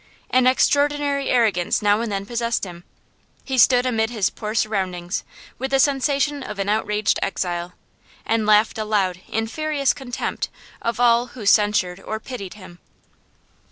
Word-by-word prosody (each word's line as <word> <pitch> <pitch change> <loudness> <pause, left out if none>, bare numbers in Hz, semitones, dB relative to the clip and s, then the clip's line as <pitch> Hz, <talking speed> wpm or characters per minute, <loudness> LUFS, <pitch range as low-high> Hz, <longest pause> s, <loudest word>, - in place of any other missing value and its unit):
An 255 0 +4
extraordinary 285 +1 +2
arrogance 215 -8 +2
now 205 +1 +3
and 230 -2 -3
then 195 0 -3
possessed 235 +1 -1
him; 175 -2 -10 0.6
he 265 - -3
stood 250 +1 +5
amid 225 -3 +1
his 215 -6 0
poor 215 0 -5
surroundings 185 -4 -1 0.4
with 265 +1 -2
the 270 0 +2
sensations 280 +1 +1
of 210 - -6
an 195 0 -2
outraged 210 0 +1
exile, 175 -2 -2 0.5
and 225 -1 0
laughed 215 +1 +4
aloud 200 -4 0
in 225 +1 -1
furious 295 +2 0
contempt 245 -3 -4 0.3
of 230 0 -2
all 240 0 +4
who 220 - -7
censured 200 -3 +3
or 220 +2 -5
pitied 215 -6 -7
him. 185 -4 -13
220 Hz, 150 wpm, -22 LUFS, 200-255 Hz, 0.6 s, stood